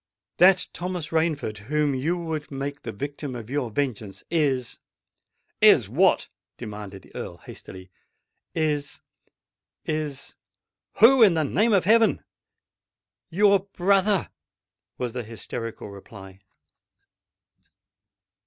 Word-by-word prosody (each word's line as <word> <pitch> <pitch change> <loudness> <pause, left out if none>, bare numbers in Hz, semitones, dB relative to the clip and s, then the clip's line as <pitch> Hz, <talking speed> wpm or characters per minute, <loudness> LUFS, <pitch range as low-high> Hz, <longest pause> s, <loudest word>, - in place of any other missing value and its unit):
"That 185 +1 +5
Thomas 180 -3 -4
Rainford 160 -10 -1
whom 150 -1 +1
you 155 +7 -1
would 160 -3 -4
make 140 +1 -5
the 115 - -6
victim 140 +3 -6
of 115 0 -8
your 140 -4 -1
vengeance, 105 -5 -3
is——" 135 -7 0 0.8
"Is - - +6
what?" - - +3 0.3
demanded 105 -4 -8
the - - -20
Earl - - -6
hastily. 95 0 -12 0.6
"Is—is——" 145 - -5 0.6
"Who? 245 +4 +6
in 200 -6 +7
the 160 - +1
name 210 - +2
of 190 -4 +3
heaven!" 225 +2 +4 1.1
"YOUR 200 +3 +4
BROTHER!" 195 +1 +1 0.7
was 125 -2 -3
the 125 - -3
hysterical 115 -1 -7
reply. 95 -1 -12
145 Hz, 105 wpm, -25 LUFS, 115-175 Hz, 1.1 s, in